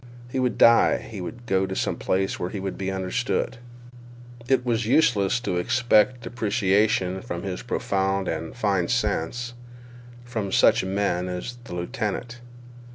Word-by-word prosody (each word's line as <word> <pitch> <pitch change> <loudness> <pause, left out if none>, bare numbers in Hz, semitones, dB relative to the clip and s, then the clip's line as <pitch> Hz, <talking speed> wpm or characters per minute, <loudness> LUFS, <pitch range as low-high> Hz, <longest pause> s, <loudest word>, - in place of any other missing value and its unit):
He 130 - -1
would 125 -2 0
die; 115 0 +6
he 105 -4 -8
would 120 +7 -7
go 95 -3 +1
to 95 - -4
some - - -1
place 95 +1 -1
where 90 - -2
he 100 - -5
would 95 0 -4
be 95 -1 -3
understood. 95 +7 -1 0.9
It 130 -2 +2
was 115 -2 0
useless 120 -6 +3
to 90 -7 -1
expect 120 +4 +2
appreciation 105 -4 +1
of 85 0 -4
his 95 -2 -4
profound 95 0 -1
and 80 0 -4
fine 100 -7 +1
sense 120 0 -1 0.7
from 110 -5 -3
such - - +4
men 95 -2 -1
as 105 +7 -5
the 90 - -7
lieutenant. 120 +4 -4
100 Hz, 150 wpm, -25 LUFS, 95-120 Hz, 0.9 s, die